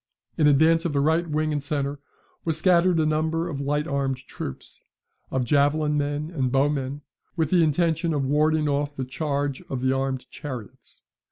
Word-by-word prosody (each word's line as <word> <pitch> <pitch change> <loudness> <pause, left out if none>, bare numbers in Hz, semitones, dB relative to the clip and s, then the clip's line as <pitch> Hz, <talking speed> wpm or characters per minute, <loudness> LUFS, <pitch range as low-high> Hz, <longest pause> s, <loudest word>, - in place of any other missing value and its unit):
In 150 - +3
advance 160 +3 +4
of 170 -4 -1
the 140 - +1
right 160 +4 +2
wing 155 +1 0
and 145 - -1
centre 140 0 -2 0.4
was 160 -2 -1
scattered 175 0 +3
a 155 - +3
number 160 +2 0
of 145 -5 -4
light 145 +2 0
armed 140 -3 -1
troops, 100 - -8 0.5
of 130 -1 -1
javelin 150 +3 +2
men 145 +2 -2
and 130 -5 0
bowmen, 140 +1 0 0.3
with 160 -3 0
the 175 -2 +5
intention 165 +2 +1
of 145 -3 0
warding 150 +2 +2
off 145 0 -1
the 130 - -3
charge 140 0 -2
of 130 -2 -3
the 130 0 +2
armed 135 -1 -2
chariots. 125 -8 -9
145 Hz, 175 wpm, -25 LUFS, 140-160 Hz, 0.5 s, the